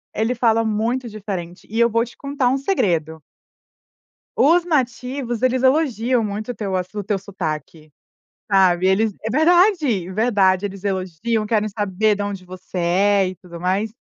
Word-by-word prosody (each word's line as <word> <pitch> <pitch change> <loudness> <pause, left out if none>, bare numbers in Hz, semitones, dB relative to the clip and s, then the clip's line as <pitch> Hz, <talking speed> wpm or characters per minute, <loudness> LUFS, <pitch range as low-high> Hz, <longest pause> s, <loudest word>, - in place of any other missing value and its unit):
ele 225 +3 0
fala 230 -2 +2
muito 230 +3 -1
diferente 190 -5 -7
e 220 - -5
eu 235 0 +5
vou 230 +1 +1
te 240 - -15
contar 280 -2 -1
um 265 - +1
segredo. 165 - -1 1.1
Os 335 +4 +4
nativos, 250 -5 -2
eles 255 0 +2
elogiam 260 -4 +2
muito 210 +3 -4
o - - -12
teu 200 -4 -4
assu 185 +3 -3
o - - -7
teu 205 0 -1
sotaque, 160 -5 -6 0.6
sabe. 185 -2 +4
Eles 205 +2 +2
É 220 - -2
verdade, 315 - +3
verdade, 200 -3 +2
eles 195 0 -9
elogiam, 195 +3 -2
querem 215 -1 +1
saber 205 +1 0
da 205 0 -3
onde 195 -2 -6
você 185 0 -8
é 190 +3 +2
e 185 - -6
tudo 175 -2 -11
mais. 190 +5 -1
210 Hz, 160 wpm, -21 LUFS, 185-245 Hz, 1.1 s, eu